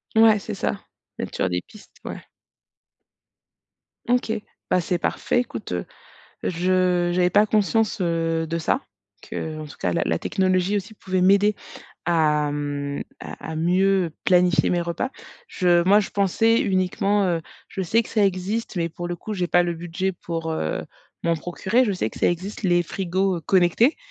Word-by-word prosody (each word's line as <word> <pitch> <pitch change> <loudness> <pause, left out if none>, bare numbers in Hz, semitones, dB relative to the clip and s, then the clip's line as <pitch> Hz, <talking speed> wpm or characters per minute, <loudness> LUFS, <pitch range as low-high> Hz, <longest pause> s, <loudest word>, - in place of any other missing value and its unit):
Ouais, 220 -1 +6
c'est 195 - -6
ça. - - -2 0.4
Mettre - - -5
sur 95 - 0
des 90 0 -1
pistes, 215 - -17
ouais. - - -6 1.9
OK, 245 -2 +2 0.4
bah, 180 - +4
c'est 175 +1 -1
parfait, 245 - 0
écoute, 115 - -6 0.7
je 180 0 +1
j'avais 180 0 +3
pas 210 +3 +5
conscience, 215 0 +1
heu, 165 -2 0
de 165 0 -1
ça, 165 +10 +1 0.5
qu'en 155 -1 -5
tout 145 - -12
cas 90 - 0
la - - 0
la 80 - 0
technologie 185 +1 +1
aussi 205 +2 -4
pouvait 185 -3 -2
m'aider 200 +3 +4 0.5
à, 150 -3 +2
mmh, 145 -1 -3 0.2
à - - -8
à - - -4
mieux 180 +1 +2
planifier 180 -2 +4
mes 175 - +1
repas. 170 +10 -2 0.4
Je 175 -2 +3
moi, 200 +3 +6
je 200 - -4
pensais 225 +4 +2
uniquement, 195 +2 +1
heu, 170 -2 0 0.3
je 190 - -4
sais 225 +6 +2
que - - -12
ça 210 -3 +3
existe 195 +4 -1
mais 170 -1 0
pour 175 +2 -6
le 175 - -3
coup, 215 +5 -6
j'ai 180 -2 -1
pas 175 - +4
le 175 -1 -1
budget 175 +3 -2
pour, 165 -2 -4
heu, 80 - -2 0.4
m'en 170 0 +3
procurer. 190 +9 +1
Je 210 - 0
sais 180 - -1
que - - -11
ça - - +3
existe 185 +5 -4
les 175 -2 +3
frigos 190 0 -1
connectés, 190 - +4
180 Hz, 170 wpm, -23 LUFS, 165-200 Hz, 1.9 s, Ouais